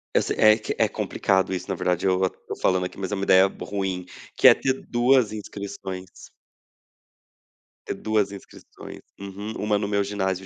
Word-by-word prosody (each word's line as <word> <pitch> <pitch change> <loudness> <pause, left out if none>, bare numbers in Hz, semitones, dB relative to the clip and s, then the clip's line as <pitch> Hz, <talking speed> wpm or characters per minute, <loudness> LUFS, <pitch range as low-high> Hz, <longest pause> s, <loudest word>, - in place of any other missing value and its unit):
eu - - +5
se - - -2
é 110 0 +6
que 110 - -4
é - - +3
complicado 95 0 0
isso, 90 +1 -4
na 95 - -2
verdade, 90 +1 -1
eu 95 0 +2
a 95 - +3
tô - - -9
falando 90 -1 +1
aqui, 90 - -8
mas 95 +1 -4
é - - 0
uma 100 - -3
ideia 95 0 +6
ruim, 95 -2 -4 0.3
que - - +7
é - - +10
ter 130 - 0
2 120 -2 +3
inscrições. 100 -3 -7 1.8
Ter - - -4
2 105 -2 0
inscrições, 100 - -12 0.2
uhum, 100 +2 -7
uma 105 0 0
no 100 0 -3
meu 100 -1 +1
ginásio 95 -2 -2
100 Hz, 185 wpm, -24 LUFS, 95-105 Hz, 1.8 s, é